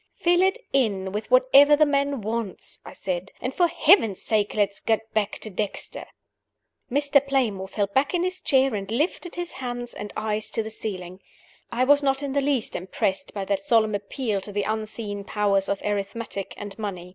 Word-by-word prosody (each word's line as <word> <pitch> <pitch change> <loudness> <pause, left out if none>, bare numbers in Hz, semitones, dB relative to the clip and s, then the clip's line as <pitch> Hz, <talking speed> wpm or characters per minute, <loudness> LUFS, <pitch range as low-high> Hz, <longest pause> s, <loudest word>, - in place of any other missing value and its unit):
"Fill 350 +1 +3
it 380 +4 +3 0.2
in 200 -8 +1
with 210 +2 -4
whatever - - +7
the 305 +1 +5
man 280 -2 0
wants," 220 -1 -4
I - - -10
said. 185 0 -4
"And 255 +1 -3
for 350 +3 +3
Heaven's 225 - +4
sake 210 -2 0
let 205 -2 +3
us 200 - -15
get 225 0 -1
back 210 -1 0
to 215 - -5
Dexter!" 205 +2 -4 0.8
Mr. 285 +1 +3
Playmore 240 -9 0
fell 205 +1 0
back 265 - +1
in 350 - +1
his 370 0 -1
chair, 265 -2 +3
and 200 -2 -4
lifted 310 +8 -1
his 350 -1 -4
hands 245 -2 -5
and 205 - -7
eyes 215 0 -1
to 225 - 0
the 220 - -7
ceiling. 185 -4 -6 0.5
I 245 +2 +1
was 285 +2 +5
not 270 0 +1
in 275 -1 -3
the 280 - +2
least 275 -5 0
impressed 190 +6 -2
by 195 -1 -3
that 195 0 -1
solemn 220 -1 +3
appeal 205 +1 -2
to 205 - -6
the 205 0 -1
unseen 215 -1 -4
powers 200 -1 +1
of 200 - -2
arithmetic 205 0 -3
and 205 +1 -8
money. 185 -4 -5
220 Hz, 195 wpm, -25 LUFS, 200-275 Hz, 0.8 s, whatever